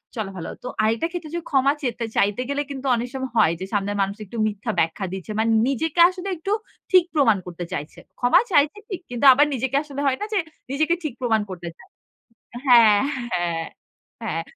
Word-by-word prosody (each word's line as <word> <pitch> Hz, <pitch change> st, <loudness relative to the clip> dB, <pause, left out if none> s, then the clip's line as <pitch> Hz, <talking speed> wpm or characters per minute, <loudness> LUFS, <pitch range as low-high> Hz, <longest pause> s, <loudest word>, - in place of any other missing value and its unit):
চলা 215 Hz, -4 st, -3 dB
ভালো। 165 Hz, -, -5 dB
তো -, -, -5 dB
আরেকটা 225 Hz, +8 st, +1 dB
ক্ষেত্রে 335 Hz, -3 st, -6 dB
যদি 340 Hz, -, -3 dB
ক্ষমা 275 Hz, 0 st, +3 dB
চেতে, 240 Hz, -3 st, -2 dB
চাইতে 205 Hz, +4 st, +2 dB
গেলে 280 Hz, 0 st, 0 dB
কিন্তু 275 Hz, 0 st, -7 dB
অনেক 240 Hz, +1 st, -3 dB
সময় 260 Hz, -2 st, -4 dB
হয় 205 Hz, -7 st, +5 dB
যে, 190 Hz, -, -4 dB
সামনের 205 Hz, 0 st, -1 dB
মানুষ 195 Hz, +1 st, -1 dB
একটু 225 Hz, +4 st, -9 dB
মিথ্যা 215 Hz, +2 st, -3 dB
ব্যাখ্যা 165 Hz, +5 st, 0 dB
দিচ্ছে। 190 Hz, +3 st, -6 dB
মানে 225 Hz, +1 st, +2 dB, 0.2 s
নিজেকে 310 Hz, +5 st, -1 dB
আসলে 370 Hz, +1 st, -7 dB
একটু 390 Hz, +5 st, -4 dB, 0.4 s
ঠিক 370 Hz, -2 st, +7 dB
প্রমাণ 245 Hz, -9 st, +4 dB
করতে 175 Hz, 0 st, -6 dB
চাইছে। 150 Hz, +4 st, -6 dB, 0.2 s
ক্ষমা 245 Hz, 0 st, +5 dB
চাইছে 290 Hz, +5 st, +3 dB
ঠিক। 380 Hz, -5 st, -4 dB
কিন্তু 245 Hz, +3 st, -2 dB
আবার 290 Hz, +3 st, +5 dB
নিজেকে 265 Hz, +1 st, -2 dB
আসলে 285 Hz, -2 st, -6 dB
হয় 260 Hz, -, +1 dB
না? -, -, -1 dB
যে, 420 Hz, -, +2 dB, 0.3 s
নিজেকে 310 Hz, +4 st, +1 dB
ঠিক 295 Hz, -6 st, -3 dB
প্রমাণ 225 Hz, -3 st, +2 dB
করতে 175 Hz, -2 st, -7 dB
চায় -, -, -18 dB, 0.8 s
হ্যাঁ, 225 Hz, -4 st, +7 dB, 0.3 s
হ্যাঁ, 170 Hz, -2 st, -1 dB, 0.6 s
হ্যাঁ। 175 Hz, -7 st, -2 dB
240 Hz, 195 wpm, -23 LUFS, 200-285 Hz, 0.8 s, ঠিক